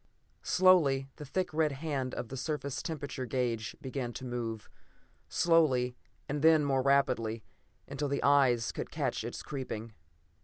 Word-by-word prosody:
Slowly 155 -8 +4
the 150 - -7
thick 180 +5 -2
red 155 -2 +2
hand 135 -3 -3
of 120 -2 -5
the 135 - -6
surface 140 0 -3
temperature 145 -5 -4
gauge 115 -2 -1
began 130 -4 -4
to 130 - -7
move; 115 -3 -4 0.6
slowly, 135 -8 +3 0.3
and 145 +1 -2
then 160 -1 +5
more 135 -2 +2
rapidly, 130 -5 +1 0.4
until 145 +1 -3
the 140 - -1
eyes 130 -5 +4
could - - -5
catch - - -2
its - - -6
creeping. 115 -5 -5
135 Hz, 145 wpm, -31 LUFS, 125-150 Hz, 0.6 s, then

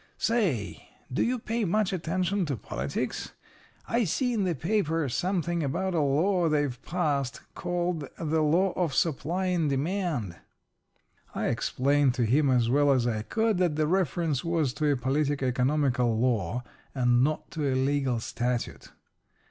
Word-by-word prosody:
Say, 170 - -1 0.2
do - - +1
you 250 +2 +1
pay 230 0 -2
much 205 +1 +1
attention 185 +2 -1
to 140 -4 -2
politics? 65 - -4 0.5
I 235 +1 +1
see 245 +7 0
in 210 -4 0
the 175 -3 0
paper 165 -2 0
something 175 +3 -1
about 180 +7 -1
a 165 - +1
law 165 +5 +2
they've 145 -5 0
passed 145 -7 -1
called 175 -4 -2
'the 160 0 0
law 175 +5 +3
of 165 -7 -1
supply 170 +5 0
and 175 -5 +1
demand.'" 140 - -1 1.0
I - - 0
explained 140 0 +1
to 120 -3 +1
him 140 +5 +3
as 125 -3 +3
well 140 +3 +3
as 130 -3 +2
I 110 -3 0
could 220 - 0
that 175 -4 +2
the 155 0 +1
reference 165 -4 0
was 165 -6 0
to 150 0 +1
a 140 - +1
politico 140 +2 0
economical 125 -2 +1
law, 115 -2 0 0.3
and 125 -1 +3
not 155 +2 -1
to 145 -4 -1
a - - 0
legal 135 -2 +1
statute. 120 +1 -3
150 Hz, 155 wpm, -28 LUFS, 130-180 Hz, 1.0 s, law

